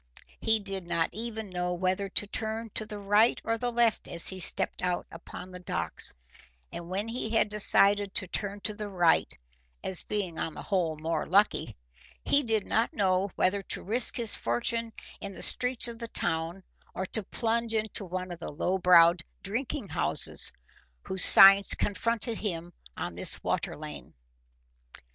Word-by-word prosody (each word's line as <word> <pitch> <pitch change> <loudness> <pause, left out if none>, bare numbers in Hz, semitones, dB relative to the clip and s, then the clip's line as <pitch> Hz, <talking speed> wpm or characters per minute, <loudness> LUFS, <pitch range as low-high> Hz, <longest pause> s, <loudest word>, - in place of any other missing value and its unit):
He 220 0 +3
did 195 -3 -5
not 165 -1 0
even 220 -2 -2
know 180 0 -2
whether 185 +2 -1
to 205 - +3
turn 220 +1 -3
to 215 - -4
the 210 -1 -7
right 205 +3 +2
or 230 0 -2
the 245 +1 -2
left 235 -1 +1
as 170 - -1
he 190 - -6
stepped 175 - +2
out 180 -1 -2
upon 180 +2 -10
the 180 - -9
docks, 85 - -1 0.6
and 170 0 -8
when 195 +4 -2
he 230 -1 -4
had 225 -1 +1
decided 205 -1 +4
to - - +2
turn 200 +2 -5
to 215 - -3
the 210 0 -6
right 175 -4 +2 0.5
as 185 - -3
being 200 -6 -3
on 160 - -4
the - - -7
whole 175 -6 -1
more 160 +2 -3
lucky, 195 - +2 0.5
he 285 - +4
did 225 -5 0
not 225 +2 0
know 190 -1 +1
whether 200 +2 +1
to - - -5
risk 230 +5 -1
his 230 -3 0
fortune 225 - -1 0.3
in 195 -2 -8
the - - -5
streets 250 -1 +2
of 230 -1 -8
the 230 - -6
town 165 -1 -2 0.3
or 190 - -3
to 220 - -4
plunge 230 +2 -2
into 215 -1 -2
one 185 0 -5
of 175 - -8
the - - -6
low 180 +6 -1
browed 170 -1 +5 0.2
drinking 235 +4 -3
houses - - +3 0.5
whose 190 -1 +1
signs 195 +1 +8
confronted 230 +2 -2
him 175 -4 -4 0.2
on - - -4
this - - -2
water - - -2
lane. 70 -4 -9
200 Hz, 170 wpm, -28 LUFS, 180-220 Hz, 0.6 s, signs